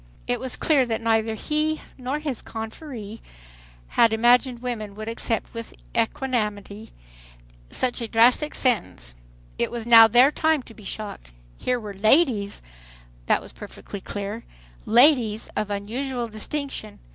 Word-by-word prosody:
It 245 -1 -1
was 260 +1 -2
clear 290 -4 +3
that 225 -1 -1
neither 225 -1 +1
he 305 +6 -1 0.2
nor 260 +2 -3
his 295 -6 -3
confreres 225 -1 -8 0.7
had 230 - +4
imagined 240 +3 +3
women 215 -5 -4
would 215 +1 -7
accept 230 0 -2
with 230 -1 -8 0.2
equanimity 220 -3 -2 0.8
so 255 - +1
drastic 240 +5 +3
a - - +1
sentence. 195 - 0 0.5
It - - +1
was 235 -2 -5
now 230 -1 +9
their 245 +5 +6
time 315 -3 +1
to 230 - -14
be 215 -2 -15
shocked. 200 - -6 0.3
Here 250 -1 -1
were 210 -3 -7
"ladies"—that - - 0
was - - -11
perfectly 200 - -9
clear—"ladies" 215 - 0
of 210 0 -2
unusual 240 +5 -3
distinction. 220 0 -5
225 Hz, 130 wpm, -24 LUFS, 210-255 Hz, 0.8 s, now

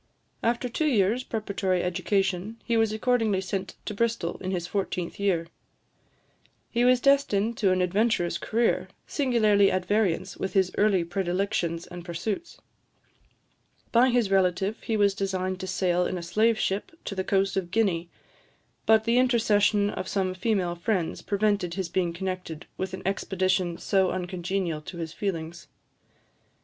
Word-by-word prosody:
After 240 +2 0
two 305 +6 -1
years' 230 -1 +2
preparatory 200 -6 -1
education, 195 +3 -1
he 235 - +1
was 225 -1 +3
accordingly 220 -3 +1
sent 190 0 -4
to - - -3
Bristol, 225 -5 -1
in 185 - -3
his 180 -3 -2
fourteenth 180 -2 -3
year. 185 -5 +1 1.3
He 240 0 +1
was 250 0 +5
destined 235 -5 +2
to 195 -4 +3
an 185 0 +2
adventurous 190 -1 +1
career, 230 +1 +1 0.2
singularly 215 -8 +3
at 185 -1 -1
variance 190 -3 0
with 190 - -3
his 190 -2 +3
early 205 -4 +3
predilections 175 -1 -1
and 175 -1 -9
pursuits. 195 - -4 1.3
By 245 +2 +5
his 240 -5 +1
relative 190 +2 +1
he 225 - -1
was 200 -1 +4
designed 185 -1 -2
to 190 - -5
sail 180 -1 +1
in 185 - -3
a 175 - -5
slave 215 +6 +2
ship 195 -1 -1
to - - -3
the 190 -1 -2
coast 195 0 +1
of 190 -3 -1
Guinea; 180 -5 0 0.8
but 220 0 +5
the 230 +2 +3
intercession 210 -4 +3
of 185 - -5
some 190 -2 0
female 185 -2 0
friends 175 -1 -1
prevented 200 -4 0
his 190 -3 -3
being 175 -1 0
connected 180 -2 -5
with 190 0 -3
an 185 - -10
expedition 185 -2 0
so 190 -2 +2
uncongenial 180 -2 -2
to 170 +3 -9
his 165 -2 -5
feelings. 170 -4 -4
195 Hz, 150 wpm, -27 LUFS, 180-215 Hz, 1.3 s, was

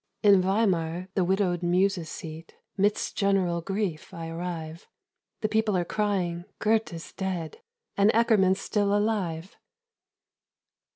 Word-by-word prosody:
"In 200 -2 +7
Weimar, 185 -3 0
the 190 - +2
widowed 180 -1 +1
muse's 180 -1 +1
seat, 160 0 -8 0.2
Midst 205 +1 0
general 190 -4 +1
grief 190 -3 -3
I 165 -1 -6
arrive. 165 -1 -6 0.5
The 215 - +1
people 220 -2 +1
are 175 - 0
crying 180 -4 -1
'Goethe's 215 -6 -1
dead, 190 - -4 0.3
And 200 +1 +4
Eckermann's 210 -5 +3
still 205 0 +1
alive!'" 195 -5 -2
190 Hz, 115 wpm, -27 LUFS, 170-205 Hz, 0.5 s, In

